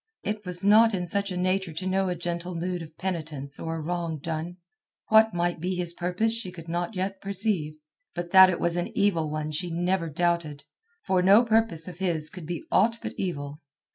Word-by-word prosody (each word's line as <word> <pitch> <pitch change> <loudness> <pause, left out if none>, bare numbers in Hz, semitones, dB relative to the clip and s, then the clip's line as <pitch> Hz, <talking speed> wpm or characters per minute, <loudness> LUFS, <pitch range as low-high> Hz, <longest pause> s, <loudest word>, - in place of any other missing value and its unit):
It 210 0 -3
was 180 +1 +1
not 220 +1 +6
in 180 -1 -2
such 200 +3 +1
a 180 - -3
nature 185 -1 0
to 165 +4 -5
know 190 0 +1
a 180 - -1
gentle 175 +1 -4
mood 175 +1 -3
of 160 -1 -11
penitence 155 -6 -4
for 165 0 -4
a - - -4
wrong 170 0 -3
done. 165 +3 -5 0.5
What 220 -2 +5
might 175 0 0
be 180 +3 -2
his 175 -1 -2
purpose 180 +6 0
she 230 -5 -4
could 165 -2 -11
not 175 +5 -3
yet 190 +1 -3
perceive, 195 -6 -2 0.4
but 175 -1 -4
that 190 -1 +9
it 180 - -1
was 170 0 0
an 175 - -1
evil 170 -6 +2
one 155 0 -3
she 175 +4 -2
never 175 0 -1
doubted, 165 -2 -1 0.4
for 185 -1 +2
no 200 +6 +6
purpose 225 -8 +2
of 180 -1 -9
his 165 -5 0
could 180 -4 -9
be 175 -2 -4
aught 230 +4 +3
but - - -4
evil. 145 -6 -4
175 Hz, 205 wpm, -26 LUFS, 165-190 Hz, 0.5 s, that